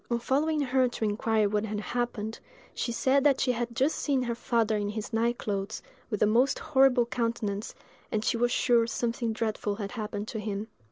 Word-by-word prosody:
On 235 - +1
following 295 +6 +1
her 260 -1 +2
to 230 - -3
inquire 215 0 +1
what 210 +1 0
had 210 -1 -3
happened, 225 -1 -3 0.3
she 235 - -2
said 265 +3 +2
that 285 -2 +4
she 255 - +2
had 235 -1 -3
just 275 +6 +2
seen 275 -3 +1
her 240 -1 -1
father 230 -2 +1
in 205 -1 -1
his 215 +2 -5
night 235 +2 +1
clothes, 200 0 -3 0.3
with 210 -4 0
a - - +6
most 240 +6 +3
horrible 270 -5 +4
countenance, 230 -4 -2 0.4
and 215 0 -1
she - - +2
was 240 +1 +1
sure 235 -2 +3
something 235 0 -1
dreadful 215 -2 -2
had 200 -1 -5
happened 210 -2 -4
to 220 - -4
him. 210 +1 -4
230 Hz, 200 wpm, -28 LUFS, 215-250 Hz, 0.4 s, a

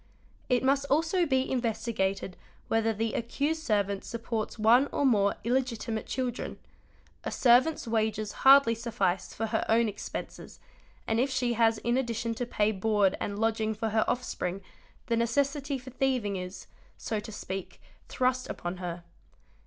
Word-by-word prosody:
| - - -32
It 250 -1 +2
must 275 +1 +2
also 330 +4 +2
be 265 -1 +1
investigated 220 -6 -1 0.3
whether 225 0 +2
the 225 +1 -2
accused 285 +7 -1
servant 200 -7 0
supports 230 -1 -4
_ - - -20
one 240 +6 +5
or 285 - 0
more 205 -6 +3
illegitimate 235 -3 -1
children; 250 -2 -3 0.7
a - - -2
servant's 255 +3 +3
wages 215 -2 0
hardly 270 -3 +7
suffice 220 -6 -1
for 225 - -1
) - - -10
her 220 - +2
own 230 +1 +4
expenses, 205 -1 -7 0.5
and 225 0 0
if 265 +3 +2
she 255 -2 0
has 225 -1 +3
in 235 +3 0
addition 230 -2 -1
to 240 +1 -4
pay 210 -2 +1
board 205 -1 +2
and 200 - -3
lodging 220 0 0
_ - - -20
for 225 +1 -1
her 220 0 +2
offspring 195 -6 -2 0.4
the 235 - 0
necessity 275 +4 0
for 260 0 -11
thieving 250 -6 0
is, 180 0 -6 0.3
so 220 - -3
to 210 - -8
speak, 195 -2 -6 0.3
thrust 255 0 0
upon 175 +1 -4
her. 175 -1 -5
230 Hz, 160 wpm, -29 LUFS, 215-255 Hz, 0.7 s, hardly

